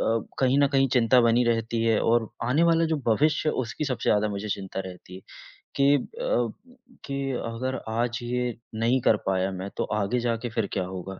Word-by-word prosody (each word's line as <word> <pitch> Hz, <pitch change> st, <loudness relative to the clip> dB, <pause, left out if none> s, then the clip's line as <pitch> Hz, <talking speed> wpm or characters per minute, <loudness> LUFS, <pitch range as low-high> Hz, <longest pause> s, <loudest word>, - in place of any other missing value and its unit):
अ, -, -, 0 dB, 0.4 s
कहीं 130 Hz, +1 st, +3 dB
न 140 Hz, -, +5 dB
कहीं 135 Hz, 0 st, +4 dB
चिंता 125 Hz, 0 st, +5 dB
बनी 120 Hz, +1 st, +3 dB
रहती 115 Hz, -1 st, 0 dB
है 115 Hz, -2 st, +3 dB
और 115 Hz, -1 st, +2 dB, 0.2 s
आने 130 Hz, +7 st, +2 dB
वाला 165 Hz, -1 st, +4 dB
जो 160 Hz, -, 0 dB
भविष्य 150 Hz, +7 st, +2 dB
है -, -, +1 dB
उसकी 120 Hz, +6 st, -4 dB
सबसे 130 Hz, -4 st, -2 dB
ज़्यादा 105 Hz, 0 st, +2 dB
मुझे 100 Hz, +1 st, -4 dB
चिंता 95 Hz, -1 st, -4 dB
रहती 90 Hz, 0 st, -11 dB
है। 95 Hz, -, -9 dB, 0.6 s
कि 140 Hz, +1 st, +4 dB, 0.3 s
अब -, -, +1 dB, 0.5 s
कि 140 Hz, 0 st, -3 dB, 0.2 s
अगर 125 Hz, +3 st, -3 dB
आज 120 Hz, +1 st, -1 dB
ये 125 Hz, -1 st, -2 dB, 0.2 s
नहीं 115 Hz, +4 st, +2 dB
कर 110 Hz, -, +4 dB
पाया 95 Hz, 0 st, +1 dB
मैं 95 Hz, +1 st, -5 dB
तो -, -, 0 dB
आगे 105 Hz, +4 st, 0 dB
जाके 120 Hz, 0 st, -2 dB
फिर 110 Hz, -2 st, -1 dB
क्या 95 Hz, -, 0 dB
होगा? 95 Hz, +1 st, -7 dB
115 Hz, 200 wpm, -26 LUFS, 105-130 Hz, 0.6 s, न